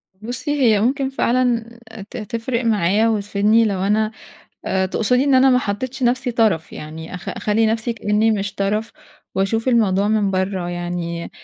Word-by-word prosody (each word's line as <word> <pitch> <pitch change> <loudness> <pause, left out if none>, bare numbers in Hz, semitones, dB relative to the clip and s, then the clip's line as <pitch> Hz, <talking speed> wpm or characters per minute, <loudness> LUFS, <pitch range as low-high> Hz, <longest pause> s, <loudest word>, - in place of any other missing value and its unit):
بُصّي، 245 +9 -4
هي 220 -5 +4
ممكن 265 +3 +1
فعلًا 235 -3 0 0.3
ت - - -8
تفرق 230 +2 -3
معايا 210 0 +2
وتفيدني 210 +1 +2
لو 200 -3 -1
أنا 215 +2 +1 0.6
آآ 190 0 +1
تقصدي 250 +7 +1
إن 275 -2 +3
أنا 265 +1 +6
ما 250 - +4
حطيتش 255 +4 -4
نفسي 250 +1 +1
طرف 220 -9 +1
يعني، 160 +3 -8
أخ 180 +3 -7
أخلي 215 +3 0
نفسي 225 +1 -1
كإني 215 0 +1
مش 200 -2 -2
طرف، 210 +3 -1 0.4
وأشوف 225 +5 0
الموضوع 205 -4 +2
من 215 -2 +1
برّه 190 -1 -1
يعني، 175 -1 -4
215 Hz, 155 wpm, -20 LUFS, 195-235 Hz, 0.6 s, أنا